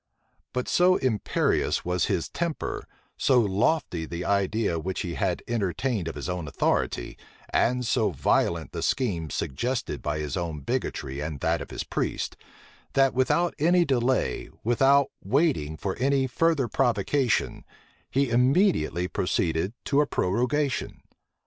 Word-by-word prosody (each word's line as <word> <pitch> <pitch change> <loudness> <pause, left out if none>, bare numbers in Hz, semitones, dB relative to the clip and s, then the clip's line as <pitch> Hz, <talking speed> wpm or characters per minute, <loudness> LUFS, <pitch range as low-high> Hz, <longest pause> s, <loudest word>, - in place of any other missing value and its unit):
But 125 0 -2
so 180 +1 +4
imperious 120 - 0
was 90 0 +1
his 85 - -1
temper, 170 -2 -3 0.3
so 130 -2 +4
lofty 100 - +1
the 85 +2 -5
idea 100 -2 +1
which 95 +3 -3
he 85 - -3
had 95 -3 -1
entertained 110 -2 -1
of - - -4
his - - -5
own 90 -3 -3
authority, - - -1 0.3
and 125 +1 +1
so 115 -1 +2
violent 80 +2 0
the 85 - -4
schemes 85 - -1
suggested 120 - -2
by 75 0 -2
his 75 -3 -3
own 80 -4 -3
bigotry 70 0 -3
and 75 -1 -4
that - - +1
of - - -7
his - - -4
priests, - - -2 0.6
that, 135 -1 +4
without 150 +7 +2
any 175 +3 +4
delay, 130 -2 0
without 135 +4 +4
waiting 105 - +1
for 95 +4 -3
any 135 +1 +2
further 145 0 +1
provocation, 125 +1 +1 0.5
he 135 -2 +1
immediately 125 - +2
proceeded 90 0 0
to 140 +1 +3
a 150 - +1
prorogation. 125 +9 -1
115 Hz, 135 wpm, -26 LUFS, 85-135 Hz, 0.6 s, so